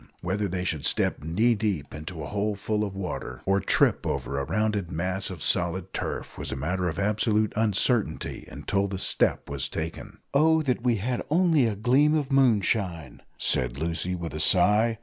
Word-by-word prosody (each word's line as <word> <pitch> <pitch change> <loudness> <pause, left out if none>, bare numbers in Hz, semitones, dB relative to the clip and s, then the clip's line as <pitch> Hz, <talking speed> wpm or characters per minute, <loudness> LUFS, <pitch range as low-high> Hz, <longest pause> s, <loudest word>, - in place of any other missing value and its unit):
Whether 100 +4 -1
they 90 0 -3
should 80 -6 -2
step - - +1
knee 105 +10 +2
deep 100 -10 -2
into 80 +1 -7
a - - -4
hole 105 +4 -1
full 105 +1 -1
of 100 -2 -4
water, 95 -2 -5
or 95 +1 +3
trip - - +2
over 70 - -2
a 70 - -2
rounded 105 -1 -1
mass 90 +3 -1
of 90 -6 -6
solid 90 +2 0
turf, - - -4
was - - -4
a - - -2
matter 90 +6 -1
of 80 - -6
absolute 105 +1 +1
uncertainty 110 -3 0
until 100 0 -1
the 95 -1 -4
step - - +1
was 70 -2 -3
taken. 85 +8 -6 0.2
"Oh 160 +2 +4
that 125 -4 0
we 120 -1 +2
had 120 +4 -2
only 160 -5 +3
a 110 - -2
gleam 130 +8 +3
of 145 -3 -1
moonshine," 100 - +1 0.2
said 60 0 0
Lucy 85 +4 -2
with 85 -4 -5
a 75 - -4
sigh. 105 +7 +3
100 Hz, 185 wpm, -26 LUFS, 85-110 Hz, 0.2 s, Oh